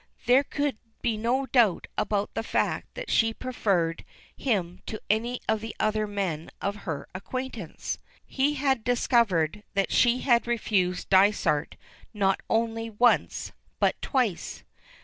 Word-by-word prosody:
There 255 +3 +5
could 285 -4 -2 0.2
be 230 -2 +1
no 240 +5 0
doubt 235 -9 +3
about 205 -1 -1
the - - -1
fact 225 - -1
that - - -5
she 225 -1 +3
preferred 195 -10 0 0.3
him 185 -8 -1
to 215 - -4
any 235 +3 -1
of 220 -1 +1
the 225 -1 -6
other 215 0 +1
men 190 -6 -3
of 200 +1 -2
her 145 -4 -3
acquaintance; 230 -2 -5 0.3
he 285 +2 0
had 265 -4 +1
discovered 210 - +2
that 195 -1 +1
she 245 +1 +4
had 240 -3 +3
refused 195 -7 0
Dysart 190 -6 +3 0.4
not 195 -2 +2
only 225 0 0
once, 235 +3 +2 0.3
but - - +1
twice. 245 - -1
220 Hz, 135 wpm, -27 LUFS, 195-245 Hz, 0.4 s, There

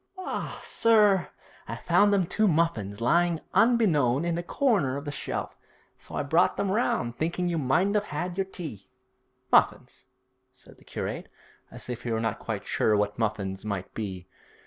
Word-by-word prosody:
'La, 375 - -4
sir, 210 -5 +3 0.4
I - - -4
found 205 0 +3
them 195 -3 +3
two 215 +5 +1
muffins 135 - 0
lying 170 +6 +2
unbeknown 165 - +3
in 170 - 0
the 170 - -1
corner 175 - +1
of 140 - -7
the 145 - -3
shelf, - - -4 0.4
so - - -10
I - - -1
brought 160 +5 +2
them 195 - 0
round, 125 - 0
thinking 170 +3 -1
you 170 -2 0
mightn't 175 +10 +2
'ave 210 0 +1
'ad 175 +4 -3
your 195 0 0
tea.' 155 - -9 0.6
'Muffins?' - - +2 0.4
said - - -18
the - - -19
curate, - - -5 0.4
as - - -8
if 120 -1 -5
he 120 - -5
were 110 -1 0
not 115 -1 -2
quite - - -4
sure 105 -1 +2
what 105 +2 -1
muffins 100 -3 -2
might 100 -3 -4
be. 95 -4 -5
160 Hz, 170 wpm, -27 LUFS, 115-190 Hz, 0.6 s, sir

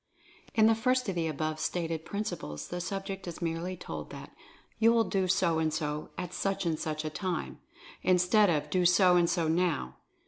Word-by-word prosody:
In 220 -1 +5
the 225 - +6
first 250 +2 +1
of - - -1
the 170 -2 -1
above 155 0 -2
stated 165 -2 -2
principles 175 - -4
the 175 0 -3
sub 195 +2 -4
ject 195 -2 -6
is 170 - -6
merely 170 +2 -3
told - - -7
that, - - -10 0.4
"You 230 +1 +6
will 230 -1 +4
do 195 -4 0
so 175 -3 +2
and 160 -1 +1
so, 150 -1 -3
at 180 - -5
such 195 -1 -1
and 160 -2 0
such 155 -1 -3
a 155 - -3
time," 180 0 -3 0.4
instead 185 +3 +4
of 150 -2 0
"Do 180 +2 +2
so 180 +1 +5
and 170 -1 +4
so 170 -3 +1
now." 160 - 0
175 Hz, 200 wpm, -30 LUFS, 160-195 Hz, 0.4 s, the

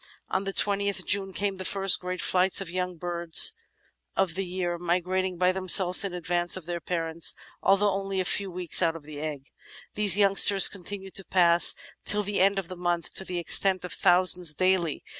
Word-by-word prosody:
On 190 +1 -3
the 195 - -4
20th 200 -1 -2
J'une 195 -1 +1
came 195 0 -4
the 185 - -7
first 195 0 +1
great 180 0 -6
flights 185 0 +1
of 190 -3 -6
young 180 -1 -5
birds 170 - +3 0.6
of 190 -4 -1
the 195 +3 -4
year, 175 -1 -5
mi 175 +1 -1
grating 185 0 -4
by 180 +1 +1
themselves 185 0 +3
in 195 - -4
advance 175 +1 -1
of 185 - -10
their 175 0 -6
parents 165 -1 -1 0.3
although 200 +1 +1
only 195 0 -4
a 185 - -2
few 200 +2 -1
weeks 180 -1 -1
out 165 -2 0
of 165 - -11
the 150 -1 -11
egg. 150 -3 -7 0.5
These 205 -3 +6
youngsters 195 -1 +6
continued 195 0 -10
to 195 - -7
pass 175 -2 +3 0.3
till 210 0 +2
the 205 0 -4
end 195 +1 +1
of 195 -3 -4
the 185 - -9
month 175 -1 -4
to - - -3
the 180 -1 -6
extent 185 +2 +2
of 180 - -8
thousands 180 -3 +2
daily. 185 -3 -1
185 Hz, 195 wpm, -25 LUFS, 175-195 Hz, 0.6 s, These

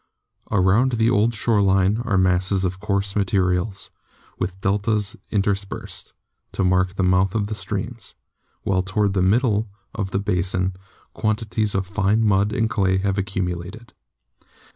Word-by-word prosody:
Around 100 +7 +3
the 115 0 +2
old 115 +1 +2
shore 110 -1 +2
line 95 +3 +3
are 105 -6 +1
masses 95 +1 +2
of 90 +1 -3
coarse 100 -1 -1
materials, 95 0 0 0.5
with 95 +1 -3
deltas 105 +1 0
interspersed, 100 -1 -3 0.4
to - - 0
mark 95 0 +2
the 95 - 0
mouths 90 +1 +2
of 105 0 -1
streams, 105 +3 -5 0.5
while 95 -1 +1
toward 100 +1 0
the 95 - +1
middle 110 +2 +2 0.2
of 100 -3 -3
the 95 - -1
basin 95 -1 0 0.4
quantities 110 -1 -1
of 95 0 0
fine 105 +3 +1
mud 100 0 +2
and 115 -2 +1
clay 95 -4 +1
have 100 +1 0
accumulated. 95 +2 -4
100 Hz, 140 wpm, -22 LUFS, 95-105 Hz, 0.5 s, Around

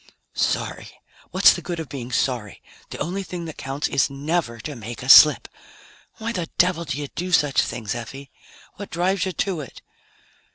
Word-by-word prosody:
"Sorry? - - -2 0.4
What's - - +6
the - - -6
good 175 -2 -5
of 160 - -5
being 130 -3 -7
sorry? 120 -4 -2 0.3
The - - -7
only 185 +4 -3
thing 180 -3 -6
that 160 - -8
counts 135 +2 -2
is 135 -3 +1
never 140 -3 -2
to 150 +4 -6
make 115 +1 -8
a 130 - -5
slip! 150 +2 +8 0.7
Why 230 0 -4
the 175 -6 -4
devil 175 -1 +2
do 145 -2 -3
you 145 -1 -4
do 180 +1 -5
such 150 -5 +3
things, 110 -4 -4
Effie? 135 +3 -8 0.5
What 200 - -8
drives 185 +3 0
you - - -2
to 185 -1 -2
it?" 135 - -11
150 Hz, 180 wpm, -23 LUFS, 130-175 Hz, 0.7 s, slip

